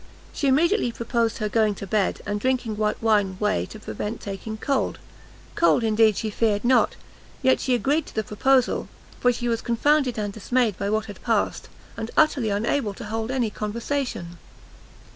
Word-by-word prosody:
She 285 - -1
immediately 315 - +3
proposed 230 -1 -1
her 215 - -1
going 215 -1 +2
to 200 - -7
bed, 195 0 0
and 205 0 -2
drinking 250 -2 0
white 210 0 0
wine 205 -4 +2
whey 210 0 0
to 215 - -10
prevent 215 +1 -5
taking 205 +2 -6
cold; 275 +4 -1 0.6
cold, 335 -7 +3
indeed, 220 -1 +3
she 220 - -2
feared 210 0 0
not; 250 +1 +4 0.5
yet 260 0 +4
she 255 - +1
agreed 285 +5 0
to - - -13
the 220 - 0
proposal, 255 +5 +2 0.3
for 245 - +4
she 240 0 -3
was 230 -1 0
confounded 260 +2 +2
and 205 -2 -2
dismayed 225 0 0
by 200 +2 -2
what 215 +1 0
had 205 -3 -10
passed, 225 -3 -1 0.3
and 225 - -4
utterly 285 -7 +3
unable 210 +1 0
to - - -8
hold 220 +2 -3
any 250 -4 0
conversation. 215 -5 -3
225 Hz, 175 wpm, -24 LUFS, 210-255 Hz, 0.6 s, not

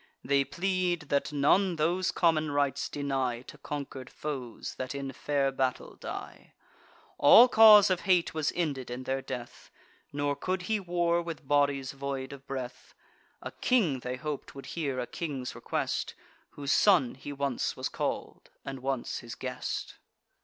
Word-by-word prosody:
They 140 0 +3
plead, 180 -2 -1
that 140 +1 +1
none 170 +6 +3
those 175 +4 +1
common 160 -3 +2
rites 140 -1 0
deny 135 -4 -2
To - - -13
conquer'd 140 -3 -6
foes 130 -6 -5
that 130 +2 -4
in 135 -1 -4
fair 140 -2 0
battle 130 -1 -2
die. - - -8 0.6
All 230 - +9
cause 215 -4 +8
of 185 - +2
hate 180 -3 +2
was 155 -2 0
ended 145 -8 -2
in 125 +1 -5
their 135 +1 -2
death; 125 -3 -8 0.4
Nor 145 0 -1
could 185 +4 -2
he 215 +3 0
war 175 -2 +1
with 165 -4 -7
bodies 140 -2 +2
void 135 -1 -5
of 140 0 -13
breath. 130 -2 -6 0.5
A - - -5
king, 190 - +1
they 125 +1 -4
hop'd, 150 +2 -5
would 135 - -9
hear 140 -6 -2
a 125 - -1
king's 135 -4 -5
request, - - -2 0.3
Whose 140 -1 -4
son 175 - +4
he 135 +2 -8
once 140 -3 -2
was - - -2
call'd, - - -4 0.2
and 135 -1 -5
once 130 -1 -2
his 120 -2 -8
guest. - - -5
140 Hz, 155 wpm, -29 LUFS, 135-170 Hz, 0.6 s, All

